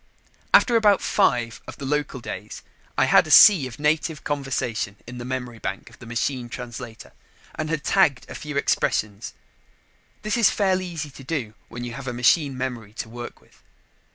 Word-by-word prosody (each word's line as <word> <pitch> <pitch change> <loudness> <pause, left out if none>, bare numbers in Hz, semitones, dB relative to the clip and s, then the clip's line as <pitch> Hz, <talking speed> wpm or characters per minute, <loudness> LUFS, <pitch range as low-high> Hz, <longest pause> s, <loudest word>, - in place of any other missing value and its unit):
After 240 - +5
about 210 -3 +5
five 120 - +1
of - - -9
the 140 - -7
local 140 -2 -2
days, - - -7 0.3
I - - +4
had - - +5
a - - -7
sea 180 -11 +8
of 125 - -10
native 150 +1 0
conversation 125 -8 -2
in 125 +1 -8
the 120 - -6
memory 125 -3 -5
bank 100 +3 -5
of - - -18
the 120 - -12
machine 120 +1 -2
translator 120 -1 -8 0.4
and 155 0 -4
had 155 -2 -2
tagged 155 -10 +2
a - - -9
few 150 -1 -6
expressions. 105 -6 -1 0.9
This 215 +2 0
is 230 -4 +5
fairly 185 -2 0
easy 160 -4 -6
to 135 - -12
do 130 -7 -3 0.2
when 120 +1 -7
you 120 -1 -5
have 140 +1 -8
a 125 - -2
machine 130 +3 +2
memory 120 -5 -5
to 110 - -6
work 120 +1 -8
with. - - -26
130 Hz, 180 wpm, -24 LUFS, 120-155 Hz, 0.9 s, sea